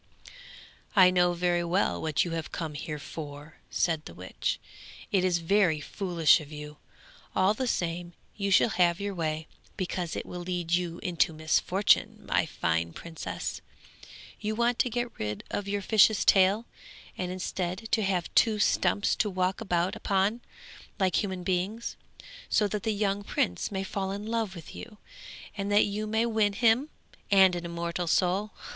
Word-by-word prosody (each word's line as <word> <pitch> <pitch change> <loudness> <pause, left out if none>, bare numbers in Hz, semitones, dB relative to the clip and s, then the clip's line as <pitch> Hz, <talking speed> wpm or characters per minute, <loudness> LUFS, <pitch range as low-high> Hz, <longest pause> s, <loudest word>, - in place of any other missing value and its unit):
'I 185 -2 +7
know 175 -1 +3
very 175 0 +1
well 175 +4 0
what 155 +1 +1
you 170 - -4
have 165 -1 -4
come 160 -3 -4
here 150 +1 -5
for,' 150 0 -9
said 160 -3 0
the - - -10
witch. - - -3 0.5
'It 195 -4 +3
is 180 -2 +2
very 170 -2 +2
foolish 170 0 +3
of 150 0 -12
you! 150 0 -8 0.6
all 190 +2 +4
the 255 +4 -2
same 175 -4 -2 0.2
you 200 -1 -2
shall 195 - +5
have 175 -3 +2
your 200 0 -3
way, 160 -2 -2 0.3
because 180 -3 -3
it - - -4
will 180 - -7
lead 175 -1 -3
you 175 -1 0
into 175 -3 +1
misfortune, 175 +5 +2
my - - +1
fine 85 0 -1
princess. 165 -1 -6 0.8
You 215 0 -2
want 235 +1 +1
to 250 - +3
get 240 0 -3
rid 105 0 -3
of 205 - -3
your 200 0 -2
fish's 215 0 +4
tail, 195 +4 +4 0.5
and 180 -1 -3
instead 185 +2 -3
to 225 - +3
have 190 -4 -1
two 220 -2 +4
stumps 205 -1 +2
to 210 - +1
walk 185 +2 -1
about 180 -3 0
upon 200 +4 0 0.6
like 185 -3 +2
human 190 -3 -4
beings, 190 +5 -2 0.5
so 210 - +3
that 210 +1 -2
the 220 - 0
young 205 -1 0
prince 90 - -1
may 190 -1 -2
fall 195 0 -3
in 200 +2 -5
love 225 -3 -2
with 165 -3 -10
you, 215 -2 -10 0.6
and 200 0 -3
that 205 - +5
you 210 +1 -3
may 220 +2 +1
win 220 -3 +2
him 235 +6 +3 0.4
and 190 -3 +6
an 175 0 -4
immortal 170 +1 -3
soul.' 185 +5 +2
185 Hz, 165 wpm, -28 LUFS, 170-205 Hz, 0.8 s, I